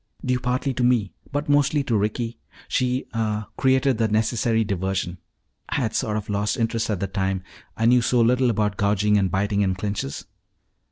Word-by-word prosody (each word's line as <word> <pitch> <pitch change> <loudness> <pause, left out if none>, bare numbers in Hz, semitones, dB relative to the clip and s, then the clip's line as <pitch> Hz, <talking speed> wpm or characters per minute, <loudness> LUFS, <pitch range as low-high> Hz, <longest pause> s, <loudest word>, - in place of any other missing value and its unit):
"Due 125 0 +1
partly 130 +2 -1
to 125 - -1
me, 120 -6 +2 0.2
but 145 +2 -2
mostly 145 0 +3
to 120 -4 0
Ricky. 110 +3 -1 0.3
She 125 0 0
ah 110 -2 -2
created 130 -2 +2
the 115 - +3
necessary 110 +1 +1
diversion. 95 -3 -2 0.5
I - - -2
had 115 -5 0
sort 105 -1 0
of 105 - -5
lost 105 0 -1
interest 115 -1 -1
at 105 -4 -1
the 100 - -1
time. 95 -2 -2 0.3
I 115 - +1
know 125 +1 +5
so 120 +1 +2
little 125 +2 +3
about 105 -3 0
gouging 105 +1 +2
and 95 -2 +1
biting 100 +3 0
in 95 -2 +1
clinches." 95 -7 -4
110 Hz, 180 wpm, -23 LUFS, 100-125 Hz, 0.5 s, know